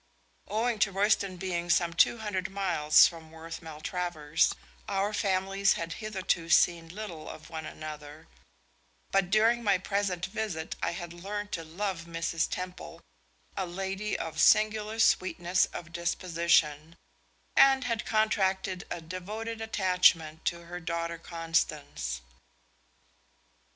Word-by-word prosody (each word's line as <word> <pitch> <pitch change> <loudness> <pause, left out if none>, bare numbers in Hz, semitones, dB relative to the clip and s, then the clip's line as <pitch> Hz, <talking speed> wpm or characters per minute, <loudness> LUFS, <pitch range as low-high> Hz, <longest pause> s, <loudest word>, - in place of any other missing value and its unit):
Owing 225 +2 0
to 200 -1 +3
Royston 195 -1 +1
being 175 -1 -3
some 170 0 +3
two 165 - +4
hundred 200 -4 -3
miles 175 -6 +5
from 165 -2 -4
Worth 165 +1 -8
Maltravers, 160 -1 -1 0.4
our 200 +2 0
families 195 0 +2
had 165 0 -4
hitherto 190 -5 -1
seen 170 -1 +4
little 180 -4 -7
of - - -11
one 160 -1 -5
another, 150 -1 -9 0.9
but 195 -2 +2
during 225 +4 +3
my 200 -3 +4
present 190 -1 -1
visit 190 -5 -4
I - - 0
had 175 -1 -6
learned 205 +4 -5
to 165 - -3
love 170 +1 -4
Mrs. 165 -1 -1
Temple, 180 - -6 0.5
a 190 -2 -2
lady 195 +3 -3
of 160 -1 -5
singular 215 0 +4
sweetness 185 -4 +3
of 170 -1 -9
disposition, 170 -2 +1 0.6
and 270 -1 +6
had 230 -3 -1
contracted 190 -4 0
a 170 - -4
devoted 210 +7 -6
attachment 180 -7 +2
to 170 0 -2
her 175 +1 -6
daughter 170 -1 -3
Constance. 155 - -2
180 Hz, 125 wpm, -29 LUFS, 165-200 Hz, 0.9 s, and